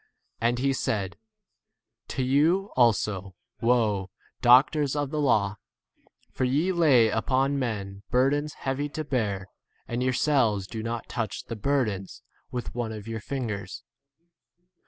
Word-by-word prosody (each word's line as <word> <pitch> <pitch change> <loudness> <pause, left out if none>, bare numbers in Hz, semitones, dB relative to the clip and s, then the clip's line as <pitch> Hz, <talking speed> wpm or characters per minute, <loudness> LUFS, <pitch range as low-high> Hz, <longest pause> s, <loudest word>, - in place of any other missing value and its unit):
And 120 +1 +1
he 135 +2 +1
said, 100 -7 -2 0.9
To 130 - -2
you 160 +9 +2
also, 105 -6 +2 0.3
woe, 110 -5 +2 0.3
doctors 135 +3 +5
of 145 -2 -1
the 155 - -1
law, 105 -7 +2 0.7
for - - -2
ye 145 +9 +2
lay 145 -10 +5
upon 135 +5 +1
men 100 -6 -3
bur 130 +2 +3
dens 145 +1 -2
heavy 135 +2 -2
to 155 +2 -4
bear, 105 -9 -1 0.4
and 120 +1 -2
yourselves 125 -6 +2
do 110 +3 -6
not 115 +1 -4
touch 115 -6 -3
the 115 - -6
burdens 110 -5 -1 0.3
with 125 -1 -4
47 120 - -8
one 115 -2 -2
of 105 0 -8
your 115 -1 -4
fingers. 120 -2 -4
120 Hz, 135 wpm, -27 LUFS, 105-140 Hz, 0.9 s, doctors